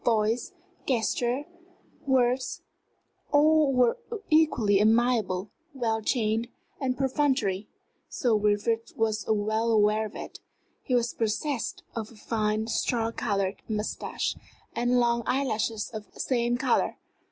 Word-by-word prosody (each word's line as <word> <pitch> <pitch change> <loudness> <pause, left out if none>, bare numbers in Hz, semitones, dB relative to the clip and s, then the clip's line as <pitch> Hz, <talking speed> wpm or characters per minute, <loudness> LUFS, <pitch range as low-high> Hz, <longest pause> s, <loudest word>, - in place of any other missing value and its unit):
Voice, 225 - +1 0.4
gesture, 245 +2 0 0.6
words 255 -1 +1 0.7
all 305 0 +5
were 250 - +3 0.3
equally 250 -11 +4
amiable, 215 -3 +2 0.2
well 225 -4 0
trained, 225 0 0 0.3
and 255 -2 -1
perfunctory 260 -7 +1 0.4
Sir 240 -3 0
Wilfrid 210 +2 0
was 220 -1 0
well 220 +2 +1
aware 215 0 +3
of 210 - -15
it. - - -8 0.4
He 255 - -1
was 240 -1 +1
possessed 230 +4 -2
of 220 -2 -4
a - - -15
fine, 215 0 -1
straw 230 0 0
colored 200 -4 -1
mustache, 215 0 -2 0.4
and 245 +1 +2
long 235 -1 +2
eyelashes 225 -5 -1
of 215 -2 -8
the - - -16
same 240 -1 +1
color. - - +1
230 Hz, 120 wpm, -27 LUFS, 215-250 Hz, 0.7 s, all